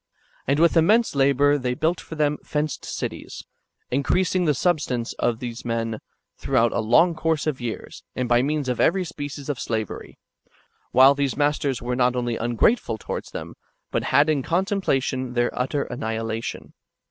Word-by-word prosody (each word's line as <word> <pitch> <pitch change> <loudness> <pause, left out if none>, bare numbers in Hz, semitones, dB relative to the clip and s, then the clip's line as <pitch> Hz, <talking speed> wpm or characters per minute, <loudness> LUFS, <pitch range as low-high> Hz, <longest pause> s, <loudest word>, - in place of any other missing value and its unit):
^ - - -59 0.4
And 140 +2 +2
with 170 +1 +4
immense 215 +8 +4
labour 140 +1 +3
they 125 -1 -1
built 165 +6 0
for 160 - -9
them 150 -1 +1
fenced 150 -1 -3
cities, - - -5 0.5
increasing 180 +7 +1
the 150 -3 +2
substance 130 -7 0
of 120 -2 +1
these 120 0 -6
men 115 -2 -2 0.4
throughout 120 -3 +2
a - - -1
long 140 +11 +4
course 160 -1 -1
of 150 -5 -2
years, 120 -2 -6
and 125 -1 -1
by 120 0 +4
means 145 0 -1
of 125 -2 -1
every 185 +2 +3
species 145 -3 -7
of 145 -4 -3
slavery; 110 -3 -4 0.7
while 130 +2 +7
these 140 -2 -1
[masters] 145 -3 0
w^ere 125 +1 -2
not 125 0 +2
only 120 -1 -1
ungrateful 120 - +1
towards - - -5
them, - - -7 0.4
but - - -1
had 145 +2 +4
in 155 -3 +1
contemplation 150 - -1
their 120 0 +1
utter 135 +3 -1
annihilation. 115 -1 -4
135 Hz, 165 wpm, -24 LUFS, 120-155 Hz, 0.7 s, while